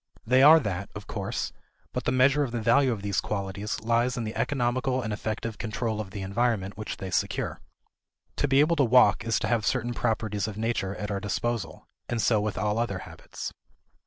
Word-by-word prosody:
They 130 +3 +4
are 155 +4 +9
that, 100 - -3
of 105 0 -7
course; 100 -2 -3 0.4
but - - -3
the - - +2
measure 135 +3 +4
of 135 -4 -1
the 120 - -2
value 125 +4 +4
of 105 -4 -4
these 100 -2 0
qualities 100 0 -3
lies 120 +3 +1
in 120 - -1
the 110 0 -5
economical 130 -1 0
and 110 -1 -2
effective 110 +1 -4
control 110 -1 -2
of 100 - -7
the 95 0 -6
environment 100 -1 0
which 110 0 -5
they 95 -1 -6
secure. - - -1 0.8
To 145 - +1
be 135 +1 +5
able 165 +3 +3
to 140 - +4
walk 115 -4 +5
is 115 0 +1
to 115 - 0
have 115 0 +1
certain 120 +2 0
properties 110 -3 -1
of 105 -2 -6
nature 110 -3 -1
at 105 0 -4
our 100 - -1
disposal 100 -3 -3 0.2
and 120 - -1
so 110 0 +3
with 105 -1 -2
all 105 +1 0
other 115 -5 -1
habits. - - -8
110 Hz, 205 wpm, -27 LUFS, 105-120 Hz, 0.8 s, are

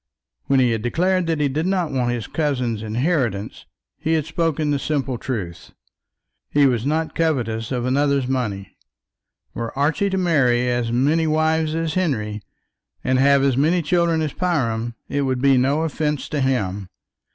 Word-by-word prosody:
When 135 -1 +3
he 125 -2 +3
had 115 -1 -1
declared 180 - +1
that 165 -2 0
he 145 - +2
did 155 +6 -1
not 185 -4 0
want 125 -3 0
his 120 -3 -3
cousin's 130 -8 -1
inheritance, 115 - -2 0.3
he 160 +1 0
had 155 -3 +1
spoken 160 -2 -1
the 145 - 0
simple 135 -5 -2
truth. 100 -11 -5 0.8
He 145 -1 +4
was 125 -1 +1
not 160 +2 -1
covetous 120 -9 -1
of 125 -2 -1
another's 140 0 +1
money. 110 -7 -3 0.8
Were 115 +3 -5
Archie 155 +8 +1
to 190 - -1
marry 130 -9 +2
as 120 -1 0
many 150 +7 +2
wives 155 0 +1
as 165 -1 -1
Henry, 110 - -1 0.6
and 130 0 +1
have 140 0 +4
as 135 -2 +2
many 165 +6 +2
children 170 0 +1
as 150 - -3
Priam, 120 -10 -1
it 145 - -1
would 130 -2 0
be 135 +1 +4
no 135 +5 +2
offence 150 -2 -2
to 145 - -1
him. 100 -8 -1
140 Hz, 165 wpm, -21 LUFS, 120-160 Hz, 0.8 s, He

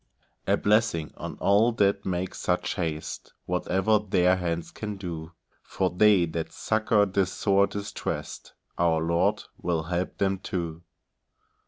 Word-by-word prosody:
A - - +3
blessing 105 -7 +1
on - - -6
all 105 +4 +4
that 100 -2 +1
make 90 0 -2
such 90 +2 -1
haste, 80 -5 -4
Whatever 95 +4 +1
their 90 -3 +3
hands 85 -2 -3
can 105 -2 -5
do! 85 -3 -6 0.3
For 95 -1 -1
they 100 -1 +5
that 80 0 -4
succour 110 -1 +2
the 95 -1 +1
sore 100 +1 +2
distressed, 100 0 -5 0.3
Our 85 -2 +3
Lord 85 +1 +1 0.2
will 85 -2 0
help 90 +2 -3
them 95 -1 0
too. 85 -4 -4
95 Hz, 135 wpm, -27 LUFS, 85-100 Hz, 0.3 s, they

